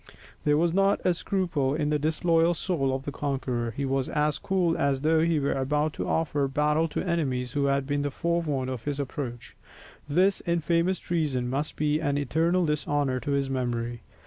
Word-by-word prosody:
There 150 Hz, 0 st, +4 dB
was 165 Hz, +1 st, +2 dB
not 195 Hz, +1 st, +3 dB
a 180 Hz, -, +4 dB
scruple 165 Hz, -7 st, -1 dB
in 150 Hz, -1 st, 0 dB
the 150 Hz, -, +2 dB
disloyal 165 Hz, +2 st, +2 dB
soul 155 Hz, -6 st, -1 dB
of 130 Hz, 0 st, -2 dB
the 145 Hz, -, -4 dB
conqueror; 130 Hz, -5 st, -2 dB
he 140 Hz, -, -1 dB
was 135 Hz, -1 st, 0 dB
as 150 Hz, -1 st, 0 dB
cool 180 Hz, -3 st, +1 dB
as 140 Hz, -1 st, +1 dB
though 160 Hz, +1 st, +3 dB
he 165 Hz, -1 st, +2 dB
were 140 Hz, -, 0 dB
about 150 Hz, +3 st, 0 dB
to -, -, -4 dB
offer 145 Hz, -3 st, 0 dB
battle 150 Hz, +3 st, +1 dB
to -, -, -3 dB
enemies 135 Hz, -9 st, -1 dB
who 140 Hz, -1 st, +1 dB
had 140 Hz, 0 st, +1 dB
been 145 Hz, +1 st, -1 dB
forewarned 150 Hz, -4 st, -1 dB
of 125 Hz, -3 st, -6 dB
his 145 Hz, -1 st, -2 dB
approach; 130 Hz, -3 st, -5 dB, 0.5 s
this 185 Hz, +6 st, +3 dB
infamous 170 Hz, +2 st, +1 dB
treason 150 Hz, -9 st, -1 dB
must 145 Hz, +3 st, -2 dB
be 150 Hz, 0 st, +1 dB
an 145 Hz, -2 st, 0 dB
eternal 165 Hz, +6 st, +1 dB
dishonour 145 Hz, -3 st, 0 dB
to 140 Hz, +4 st, -2 dB
his 140 Hz, -1 st, +1 dB
memory. 120 Hz, -3 st, -2 dB
145 Hz, 185 wpm, -27 LUFS, 135-165 Hz, 0.5 s, There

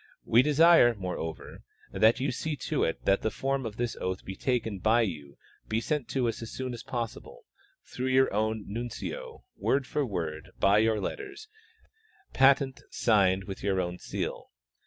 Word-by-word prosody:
We 120 Hz, -, +5 dB
desire, 150 Hz, -3 st, +6 dB
moreover, 90 Hz, -4 st, -6 dB, 0.3 s
that 110 Hz, +6 st, +4 dB
you 135 Hz, +1 st, 0 dB
see 150 Hz, +4 st, -3 dB
to 150 Hz, +1 st, -1 dB
it 80 Hz, -, -2 dB
that 95 Hz, -, +3 dB
the 110 Hz, -, 0 dB
form 135 Hz, +2 st, -2 dB
of 105 Hz, -, -9 dB
this 120 Hz, -1 st, -2 dB
oath 95 Hz, +1 st, -3 dB, 0.2 s
taken 115 Hz, -6 st, -1 dB
by 110 Hz, +5 st, +3 dB
you 75 Hz, -8 st, -5 dB, 0.3 s
be 110 Hz, -, 0 dB
sent 145 Hz, +2 st, -2 dB
to 130 Hz, -3 st, 0 dB
us 115 Hz, -, -3 dB
as 115 Hz, -, -6 dB
soon 130 Hz, -1 st, -5 dB
as 120 Hz, -, -7 dB
jDossible, 120 Hz, -3 st, -6 dB, 0.4 s
through 130 Hz, -, -4 dB
your 130 Hz, -2 st, +3 dB
own 110 Hz, 0 st, -1 dB
nuncio, 120 Hz, -, -6 dB
word 135 Hz, 0 st, +1 dB
for 150 Hz, -, -1 dB
word, 85 Hz, -, -4 dB
by 100 Hz, +2 st, +5 dB
your 110 Hz, -1 st, +2 dB
letters 415 Hz, -, -6 dB, 0.9 s
patent, 135 Hz, -1 st, +4 dB
signed 95 Hz, -4 st, +2 dB
with 95 Hz, 0 st, -7 dB
your 95 Hz, -2 st, 0 dB
own 90 Hz, 0 st, -3 dB
seal. -, -, -5 dB
115 Hz, 165 wpm, -28 LUFS, 100-135 Hz, 0.9 s, desire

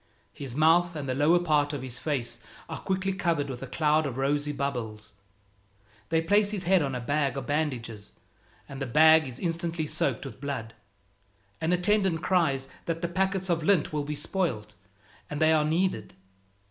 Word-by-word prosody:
His 135 Hz, -4 st, -5 dB
mouth 165 Hz, +3 st, +4 dB
and 145 Hz, -3 st, -4 dB
the 130 Hz, -, 0 dB
lower 150 Hz, +6 st, +4 dB
part 150 Hz, -4 st, +1 dB
of 140 Hz, -3 st, -4 dB
his 130 Hz, -1 st, -4 dB
face 130 Hz, -3 st, -3 dB, 0.3 s
are -, -, -6 dB
quickly 190 Hz, 0 st, -1 dB
covered 165 Hz, -7 st, -1 dB
with 120 Hz, -, -7 dB
a 135 Hz, -, -6 dB
cloud 150 Hz, +3 st, +1 dB
of 130 Hz, -2 st, -5 dB
rosy 145 Hz, +2 st, 0 dB
bubbles. 120 Hz, -7 st, -4 dB, 1.0 s
They 165 Hz, 0 st, +2 dB
place 205 Hz, +4 st, +3 dB
his 205 Hz, -3 st, -3 dB
head 185 Hz, 0 st, +4 dB
on 135 Hz, -3 st, -2 dB
a -, -, -2 dB
bag 140 Hz, +3 st, 0 dB
of 135 Hz, -, -4 dB
bandages, 120 Hz, -8 st, -3 dB, 0.6 s
and 135 Hz, 0 st, -8 dB
the 135 Hz, -, -2 dB
bag 155 Hz, +3 st, +6 dB
is 125 Hz, -, -8 dB
instantly 170 Hz, -2 st, -2 dB
soaked 140 Hz, -3 st, -1 dB
with 135 Hz, -, -9 dB
blood. 130 Hz, -6 st, -4 dB, 0.9 s
An 160 Hz, -, 0 dB
attendant 180 Hz, -2 st, +2 dB
cries 140 Hz, -8 st, +1 dB, 0.2 s
that 165 Hz, 0 st, -3 dB
the -, -, +1 dB
packets 190 Hz, +1 st, -1 dB
of 170 Hz, -2 st, +1 dB
lint 160 Hz, -2 st, +2 dB
will 150 Hz, -1 st, -1 dB
be 150 Hz, +1 st, -4 dB
spoiled, 140 Hz, -, -2 dB, 0.6 s
and 150 Hz, -, -4 dB
they 160 Hz, 0 st, +4 dB
are 155 Hz, -1 st, +3 dB
needed. 160 Hz, -, -1 dB
150 Hz, 180 wpm, -27 LUFS, 135-170 Hz, 1.0 s, bag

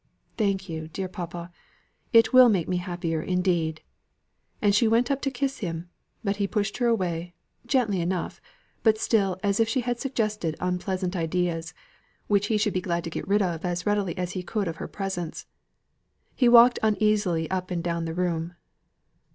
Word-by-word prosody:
"Thank 195 Hz, -3 st, 0 dB
you, 160 Hz, -2 st, -5 dB
dear 185 Hz, +4 st, -4 dB
papa. 175 Hz, -2 st, -7 dB, 0.6 s
It 230 Hz, +1 st, +5 dB
will 255 Hz, -1 st, +9 dB
make 185 Hz, -7 st, +1 dB
me 180 Hz, -, 0 dB
happier, 175 Hz, -3 st, -2 dB
indeed." 175 Hz, -3 st, 0 dB, 0.8 s
And 205 Hz, -1 st, +3 dB
she 220 Hz, +3 st, +4 dB
went 235 Hz, +4 st, +2 dB
up 275 Hz, 0 st, 0 dB
to 275 Hz, -, 0 dB
him -, -, -14 dB
to 245 Hz, -, -11 dB
kiss 275 Hz, -1 st, 0 dB
him. 170 Hz, -2 st, -5 dB, 0.3 s
But 200 Hz, -1 st, -1 dB
he 200 Hz, -1 st, 0 dB
pushed 210 Hz, 0 st, -1 dB
her 245 Hz, -1 st, +1 dB
away 175 Hz, -6 st, -1 dB, 0.3 s
gently 220 Hz, -9 st, +1 dB
enough, 175 Hz, +1 st, -3 dB, 0.4 s
but 220 Hz, -1 st, +4 dB
still 195 Hz, -5 st, +1 dB
as 200 Hz, 0 st, +1 dB
if 225 Hz, 0 st, +3 dB
she 255 Hz, +2 st, +1 dB
had 245 Hz, 0 st, -2 dB
suggested 215 Hz, -, -1 dB
unpleasant 180 Hz, +1 st, -2 dB
ideas, 170 Hz, -1 st, -1 dB, 0.5 s
which 205 Hz, -1 st, +2 dB
he 220 Hz, -, +2 dB
should 210 Hz, -1 st, +1 dB
be 185 Hz, -, 0 dB
glad 170 Hz, -1 st, -1 dB
to 165 Hz, -, -5 dB
get -, -, -5 dB
rid 205 Hz, +1 st, +3 dB
of 170 Hz, -3 st, -2 dB
as 180 Hz, -1 st, -2 dB
readily 205 Hz, -4 st, 0 dB
as 180 Hz, -1 st, -2 dB
he 185 Hz, -, -4 dB
could 200 Hz, +2 st, -2 dB
of 165 Hz, -1 st, -4 dB
her -, -, -5 dB
presence. 190 Hz, -5 st, -5 dB, 0.9 s
He 245 Hz, -3 st, +3 dB
walked 240 Hz, +1 st, +7 dB
uneasily 210 Hz, -6 st, +1 dB
up 185 Hz, -1 st, -2 dB
and 175 Hz, -2 st, -2 dB
down 170 Hz, -1 st, -1 dB
the 165 Hz, 0 st, -4 dB
room. 175 Hz, -1 st, -2 dB
185 Hz, 185 wpm, -26 LUFS, 175-215 Hz, 0.9 s, will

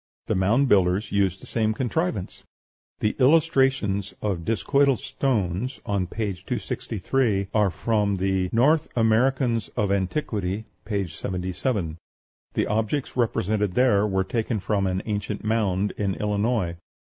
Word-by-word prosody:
The -, -, 0 dB
Mound 110 Hz, +9 st, +3 dB
Builders 95 Hz, -1 st, +2 dB
used 95 Hz, -2 st, +1 dB
the -, -, -8 dB
same 110 Hz, -1 st, 0 dB
contrivance. 130 Hz, -, -2 dB, 0.6 s
The 105 Hz, -, +1 dB
illustrations 135 Hz, -, +3 dB
of 95 Hz, -5 st, -2 dB
discoidal 135 Hz, +4 st, +2 dB
stones 115 Hz, -1 st, -1 dB
on 100 Hz, -3 st, -1 dB
page 100 Hz, -2 st, -4 dB
263 105 Hz, -2 st, -1 dB
are 105 Hz, -2 st, +3 dB
from 105 Hz, +2 st, 0 dB
the 95 Hz, -1 st, 0 dB
"North 150 Hz, +7 st, +3 dB
Americans 115 Hz, 0 st, +2 dB
of 100 Hz, -2 st, +1 dB
Antiquity," 100 Hz, -1 st, -1 dB, 0.2 s
p. 100 Hz, -3 st, -1 dB
77. 90 Hz, -, -3 dB, 0.6 s
The -, -, +2 dB
objects 110 Hz, +6 st, -1 dB
represented 105 Hz, -4 st, 0 dB
were 100 Hz, -6 st, +3 dB
taken 110 Hz, +2 st, -1 dB
from 100 Hz, 0 st, 0 dB
an 95 Hz, 0 st, -1 dB
ancient 105 Hz, -1 st, -3 dB
mound 105 Hz, -3 st, +1 dB
in 100 Hz, -2 st, 0 dB
Illinois. 105 Hz, -4 st, 0 dB
105 Hz, 125 wpm, -25 LUFS, 95-120 Hz, 0.6 s, Mound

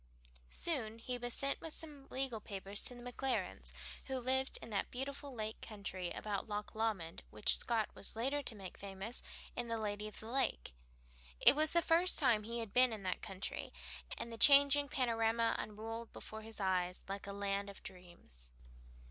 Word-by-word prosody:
Soon 230 Hz, -10 st, 0 dB
he 245 Hz, +2 st, -3 dB
was 245 Hz, 0 st, -3 dB
sent 275 Hz, +3 st, +1 dB
with 325 Hz, -2 st, -5 dB
some 290 Hz, -4 st, -7 dB
legal 260 Hz, -4 st, -1 dB
papers 200 Hz, 0 st, -1 dB
to 250 Hz, -, -1 dB
the 240 Hz, -, -10 dB
Maclarens, 255 Hz, +2 st, -2 dB, 0.3 s
who 265 Hz, -1 st, -2 dB
lived 260 Hz, +2 st, +2 dB
in 230 Hz, -, -9 dB
that 200 Hz, -, 0 dB
beautiful 275 Hz, +2 st, -4 dB
lake 220 Hz, -3 st, -4 dB
country 195 Hz, -4 st, -4 dB
about 210 Hz, 0 st, -3 dB
Loch 210 Hz, 0 st, -3 dB
Lomond 215 Hz, -7 st, -1 dB
which 105 Hz, 0 st, +4 dB
Scott 225 Hz, -3 st, +1 dB
was 200 Hz, -, -5 dB
later 270 Hz, +6 st, 0 dB
to 240 Hz, -, -5 dB
make 195 Hz, -3 st, -8 dB
famous 195 Hz, +4 st, -5 dB, 0.3 s
in 245 Hz, -, -2 dB
"The 230 Hz, 0 st, 0 dB
Lady 210 Hz, -1 st, -2 dB
of 215 Hz, -, -8 dB
the -, -, -8 dB
Lake." 250 Hz, -, +1 dB, 0.7 s
It -, -, +9 dB
was 310 Hz, +1 st, +3 dB
the 340 Hz, 0 st, +5 dB
first 345 Hz, +2 st, +4 dB
time 245 Hz, -7 st, +4 dB
he 230 Hz, +3 st, -3 dB
had 225 Hz, -3 st, -5 dB
been 255 Hz, 0 st, +7 dB
in 215 Hz, -3 st, -4 dB
that 185 Hz, -1 st, -1 dB
country, 195 Hz, +1 st, -4 dB, 0.5 s
and 235 Hz, -, -4 dB
the 225 Hz, -, -7 dB
changing 285 Hz, 0 st, +7 dB
panorama 230 Hz, -2 st, +2 dB
unrolled 225 Hz, +2 st, -5 dB
before 220 Hz, 0 st, -7 dB
his 220 Hz, 0 st, -7 dB
eyes 185 Hz, -2 st, +1 dB
like 195 Hz, 0 st, -4 dB
a -, -, -3 dB
land 200 Hz, 0 st, -1 dB
of 200 Hz, -, -10 dB
dreams. 175 Hz, -, -9 dB
225 Hz, 180 wpm, -37 LUFS, 200-260 Hz, 0.7 s, It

